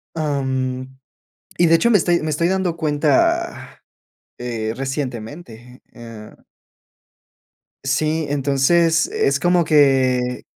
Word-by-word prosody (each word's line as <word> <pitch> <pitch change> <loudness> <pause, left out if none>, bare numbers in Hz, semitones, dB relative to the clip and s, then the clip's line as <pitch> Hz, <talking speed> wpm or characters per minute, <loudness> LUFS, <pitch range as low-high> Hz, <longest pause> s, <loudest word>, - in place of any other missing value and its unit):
am, 130 -3 -3 0.6
y 175 - +4
de 165 - +5
hecho, 235 +8 +2
me 215 - +6
estoy 175 0 +1
me 155 - -3
estoy 170 +3 0
dando 185 -2 -1
cuenta, 165 - 0 0.6
eh, 115 -3 -4
recientemente, 125 -2 -6
eh. 115 -3 -12 1.5
Sí. 155 +3 0
Entonces, 145 +4 +2
es 140 0 0
como 175 +2 +2
que 130 -4 +2
145 Hz, 100 wpm, -20 LUFS, 130-165 Hz, 1.5 s, me